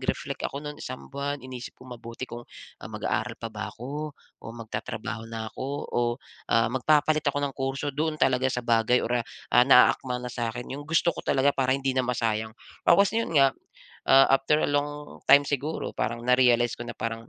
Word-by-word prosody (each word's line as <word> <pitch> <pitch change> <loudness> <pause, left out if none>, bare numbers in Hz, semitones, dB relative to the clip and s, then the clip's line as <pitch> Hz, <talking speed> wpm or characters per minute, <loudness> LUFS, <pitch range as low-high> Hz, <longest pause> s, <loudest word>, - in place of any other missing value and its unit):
reflect - - -3
ako 140 +2 -7
no'n 150 0 -7
isang 130 +2 -8
buwan 140 -1 -3
inisip 125 -2 -8
kong 130 -1 -11
mabuti 115 +1 -7
kung, 120 -1 -8 0.4
ah, - - -8
mag-aaral - - -2
pa - - -7
ba - - -5
ako 145 +4 -6 0.2
o - - -23 0.2
magtatrabaho 115 +1 -5
na 110 -1 -6
ako 130 - -5 0.3
o, - - +1 0.5
ah, 115 +1 +2
magpapalit 150 +3 +2
ako 145 0 -1
ng 140 - -3
kurso 135 +2 -3
doon 155 +2 -1
talaga 130 -2 +2
sa 125 -2 -3
bagay 115 +1 +3
or, 120 0 0
ah, - - -5 0.3
ah, 125 0 +7
na-aakma 125 0 +5
na 125 - -5
sa 120 -2 -2
akin, 120 +3 -6
yung 145 +3 -7
gusto 165 +1 +2
ko - - -7
talaga 140 +1 +2
para 130 0 +1
hindi 135 -1 -1
na 130 - +1
masayang. 115 -3 -1 0.2
Tapos 200 +4 +4
'yon 230 0 0
nga, 135 -2 +6 0.6
ah, 135 0 +8
after 150 +3 +2
a - - 0
long 145 +1 -3
time 145 0 +8
siguro 145 +3 -2
parang 120 +1 -2
na-realize 125 -1 +4
ko 120 - -6
na - - -7
parang, 115 +1 -4
130 Hz, 200 wpm, -26 LUFS, 120-145 Hz, 0.6 s, ah